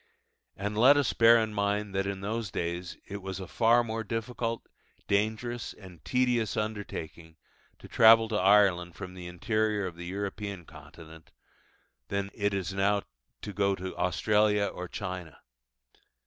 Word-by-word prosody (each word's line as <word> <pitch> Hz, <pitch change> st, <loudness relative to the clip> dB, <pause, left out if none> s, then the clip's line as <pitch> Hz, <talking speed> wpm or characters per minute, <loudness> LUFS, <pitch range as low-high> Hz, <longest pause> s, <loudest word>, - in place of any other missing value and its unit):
And 105 Hz, +2 st, -3 dB
let 130 Hz, +6 st, +6 dB
us 145 Hz, -, +1 dB
bear 115 Hz, 0 st, +7 dB
in 110 Hz, -1 st, -1 dB
mind 100 Hz, 0 st, -1 dB
that 95 Hz, 0 st, 0 dB
in 100 Hz, -1 st, -4 dB
those 110 Hz, +1 st, -3 dB
days 85 Hz, +1 st, -4 dB
it 100 Hz, 0 st, -7 dB
was 95 Hz, 0 st, -5 dB
a 95 Hz, -, -7 dB
far 120 Hz, +4 st, +3 dB
more 110 Hz, -1 st, -3 dB
difficult, 115 Hz, +1 st, -3 dB, 0.4 s
dangerous, 110 Hz, +4 st, -1 dB
and 95 Hz, -5 st, -14 dB
tedious 125 Hz, -4 st, +1 dB
undertaking 85 Hz, -7 st, -5 dB, 0.4 s
to -, -, -13 dB
travel 115 Hz, 0 st, +6 dB
to 110 Hz, -, -2 dB
Ireland 95 Hz, -3 st, +4 dB
from 90 Hz, -2 st, -8 dB
the 90 Hz, -1 st, -8 dB
interior 105 Hz, +3 st, -1 dB
of 90 Hz, -2 st, -5 dB
the 85 Hz, 0 st, -7 dB
European 100 Hz, -1 st, -5 dB
Continent, 80 Hz, +2 st, -14 dB, 0.8 s
than 100 Hz, 0 st, -3 dB
it 100 Hz, -1 st, 0 dB
is 95 Hz, -1 st, -3 dB
now 100 Hz, +1 st, +1 dB, 0.4 s
to 105 Hz, -, -6 dB
go 100 Hz, -1 st, +1 dB
to 95 Hz, 0 st, -6 dB
Australia 105 Hz, +3 st, +2 dB
or 90 Hz, -2 st, -5 dB
China. 90 Hz, -6 st, -6 dB
100 Hz, 150 wpm, -29 LUFS, 90-110 Hz, 0.8 s, bear